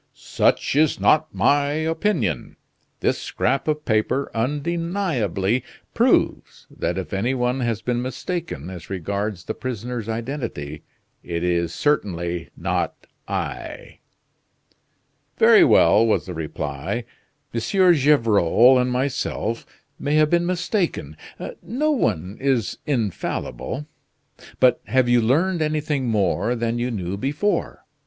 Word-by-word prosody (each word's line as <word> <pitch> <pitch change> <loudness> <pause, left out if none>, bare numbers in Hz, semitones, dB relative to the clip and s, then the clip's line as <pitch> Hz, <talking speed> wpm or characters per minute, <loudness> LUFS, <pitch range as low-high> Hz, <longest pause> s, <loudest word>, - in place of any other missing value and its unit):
"Such - - +1
is 155 0 +3
not 155 0 +3
my 145 0 +2
opinion. 160 - -1 0.5
This - - +1
scrap 135 +4 -1
of 150 0 -1
paper 110 +5 0
undeniably 140 - -1 0.3
proves - - +1
that - - -2
if - - -5
any 115 +7 0
one 125 +1 0
has 115 -3 -1
been 120 0 0
mistaken 130 - -4
as 90 -2 -9
regards 100 0 -3
the - - -4
prisoner's 120 -2 -5
identity, 115 - -4 0.4
it 85 -1 -4
is 85 -1 +1
certainly 85 - -1
not - - -2 0.2
I." - - -5 1.4
"Very - - +7
well," 110 - +5
was 110 - +1
the 90 - -6
reply. 80 - -4 0.5
"M. 115 - 0 0.3
Gevrol 125 - +4
and 125 0 +1
myself 125 -3 -2 0.3
may 145 +1 0
have 155 0 +4
been 175 0 +2
mistaken: 175 - -1 0.5
no 300 +6 0
one 95 - -1
is 130 -5 0
infallible. 120 - -2 0.7
But 125 -2 +4
have 130 -1 +2
you 120 0 +4
learned 165 +10 +2
anything 150 -3 -1
more 105 +1 +1
than 115 0 -1
you 120 +1 -1
knew 95 -4 -3
before? 145 - -1
125 Hz, 120 wpm, -22 LUFS, 100-150 Hz, 1.4 s, Very